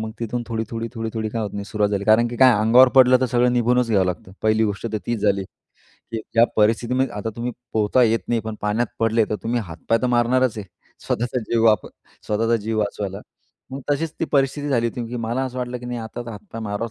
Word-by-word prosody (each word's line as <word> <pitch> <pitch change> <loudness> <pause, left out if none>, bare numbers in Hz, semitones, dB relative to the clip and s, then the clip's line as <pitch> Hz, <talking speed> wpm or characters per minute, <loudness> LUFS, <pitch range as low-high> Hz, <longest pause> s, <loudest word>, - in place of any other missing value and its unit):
मग 110 0 -4
तिथून 120 +1 -2
थोडी, 115 -1 -2
थोडी, 115 0 -4
थोडी, 115 -1 -3
थोडी 110 -1 -2
काय 115 0 -2
होत 105 - -3
नाही, 100 0 -4
सुरुवात 105 0 0
झाली, 100 -1 -1
कारण 110 +3 +4
की 120 - -6
काय, 130 0 +7
अंगावर 120 +4 +6
पडलं 130 -1 +7
तर 130 - +2
सगळं 125 0 +2
निघूनच 125 0 +2
घ्यावं 95 -4 +3
लागतं. 90 +1 -5
पहिली 110 0 +3
गोष्ट 105 +2 -3
तर - - 0
तीच 120 -2 -1
झाली, 100 -1 +2 0.5
की 115 - -8 0.2
ज्या 115 0 +6
परिस्थितीमध्ये 120 +4 +2
आता 105 +2 -3
तुम्ही 120 +1 -3 0.2
पोहता 110 +4 +3
येत 115 -1 +3
नाही, 120 -1 +1
पण 110 0 -6
पाण्यात 105 +3 0
पडले, 115 0 +3
तर 105 - 0
तुम्ही 120 +1 -1
हातपाय 85 +6 -1
तर - - +2
मारणारच 125 0 +2
आहे, 100 - -6 0.4
स्वतःचा 120 +2 -1
जीव 115 -1 +2
वाच 110 -1 +3 0.4
स्वतःचा 115 +2 +1
जीव 110 0 -2
वाचवायला, 100 -1 -3 0.5
मग 135 +1 -6
तशीच 155 +2 0
ती - - +2
परिस्थिती 140 +1 +1
झाली 120 -4 +1
होती, 120 0 -5
की 125 - -5
मला 120 +2 -2
असं 130 -1 -5
वाटलं, 125 0 -3
की 125 - -9
नाही, 120 -1 -4
आता 115 +2 -6
तर - - -6
हातपाय 110 +1 -9
मारावाच 105 +2 -3
115 Hz, 230 wpm, -22 LUFS, 110-125 Hz, 0.5 s, काय